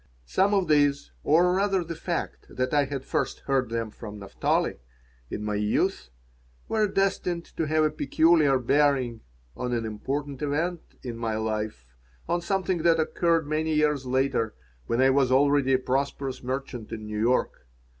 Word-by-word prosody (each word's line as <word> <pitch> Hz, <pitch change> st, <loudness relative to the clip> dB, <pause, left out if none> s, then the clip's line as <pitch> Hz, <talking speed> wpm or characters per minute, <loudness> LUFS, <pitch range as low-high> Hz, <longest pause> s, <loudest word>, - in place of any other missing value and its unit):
Some 195 Hz, -, +2 dB
of 190 Hz, -3 st, +1 dB
these, 145 Hz, -2 st, +2 dB
or 175 Hz, +4 st, +4 dB
rather 195 Hz, -2 st, +1 dB
the 165 Hz, 0 st, -5 dB
fact 170 Hz, +2 st, -4 dB
that 130 Hz, +2 st, -2 dB
I 145 Hz, -1 st, +4 dB
had 135 Hz, -1 st, -5 dB
first -, -, -2 dB
heard 135 Hz, -3 st, 0 dB
them 115 Hz, -1 st, -3 dB
from 105 Hz, -2 st, -9 dB
Naphtali, 100 Hz, -9 st, -1 dB, 0.5 s
in 105 Hz, -, -4 dB
my 105 Hz, 0 st, -2 dB
youth, 105 Hz, -, 0 dB, 0.6 s
were 215 Hz, -1 st, +2 dB
destined 190 Hz, -3 st, 0 dB
to 160 Hz, -, -1 dB
have 155 Hz, +1 st, +2 dB
a 155 Hz, -, +2 dB
peculiar 155 Hz, -1 st, +3 dB
bearing 130 Hz, -3 st, +1 dB, 0.3 s
on 125 Hz, -1 st, -3 dB
an 115 Hz, -1 st, -1 dB
important 135 Hz, +6 st, -4 dB
event 160 Hz, +4 st, -1 dB, 0.2 s
in 120 Hz, -3 st, -5 dB
my 115 Hz, -2 st, -2 dB
life, 105 Hz, -, -4 dB, 0.3 s
on 175 Hz, 0 st, 0 dB
something 185 Hz, 0 st, 0 dB
that 165 Hz, 0 st, +3 dB
occurred 165 Hz, 0 st, +1 dB
many 155 Hz, +1 st, 0 dB
years 150 Hz, -2 st, +2 dB
later, 130 Hz, -3 st, 0 dB, 0.3 s
when 115 Hz, -, 0 dB
I 135 Hz, -, +5 dB
was 135 Hz, -1 st, +2 dB
already 140 Hz, 0 st, +4 dB
a -, -, +5 dB
prosperous 135 Hz, +1 st, -2 dB
merchant 130 Hz, -3 st, -5 dB
in 110 Hz, -1 st, -6 dB
New 105 Hz, 0 st, -4 dB
York. 115 Hz, -, 0 dB
140 Hz, 165 wpm, -26 LUFS, 120-160 Hz, 0.6 s, I